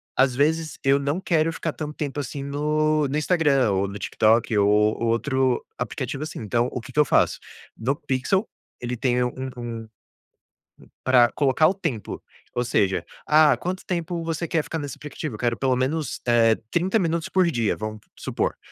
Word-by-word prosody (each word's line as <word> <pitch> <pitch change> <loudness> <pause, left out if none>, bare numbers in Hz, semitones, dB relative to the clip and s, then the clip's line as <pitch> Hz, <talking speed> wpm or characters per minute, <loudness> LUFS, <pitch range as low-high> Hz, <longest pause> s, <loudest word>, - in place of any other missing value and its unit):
às 130 -1 +3
vezes 155 +3 +1
eu 135 +1 +4
não 145 +5 -1
quero 165 -3 +1
ficar 165 -1 -3
tanto 150 -1 -5
tempo 145 -1 -3
assim 140 0 -5
no 150 +1 +1
no 145 +3 -1
Instagram 150 - +2
ou 95 +1 +1
no 100 - -6
TikTok 110 +2 +2
ou 100 0 +4 0.3
outro 130 +2 +1
aplicativo, 135 +2 -4
assim. 155 - -6
Então, 115 +3 0
o 125 - -4
que 130 - -11
que 150 - -1
eu 150 - +6
faço? - - +2 0.4
No 135 +5 0
Pixel, 145 - 0 0.3
ele 120 0 -3
tem 125 0 +1
um - - +2
um, 130 0 -4
hum, 115 -2 -6 1.2
pra 125 -2 +5
colocar 145 +2 +3
o 190 - +2
templo. 165 - -4 0.3
Ou 120 - +1
seja: 95 -6 +1 0.2
"Ah, 155 0 +6
quanto 185 +1 -4
tempo 170 -1 -2
você 165 +1 -2
quer 160 -1 0
ficar 160 - -4
nesse 145 -3 -6
aplicativo?". 150 -3 -6
"Eu - - -11
quero 120 -1 0
pelo 130 -1 +1
menos, 140 +5 -1
eh 115 -2 +4
30 190 +6 +2
minutos 165 -2 -1
por 185 -1 +3
dia", 115 -4 0
vamos 110 0 -5 0.2
supor. - - -2
140 Hz, 185 wpm, -24 LUFS, 120-155 Hz, 1.2 s, eu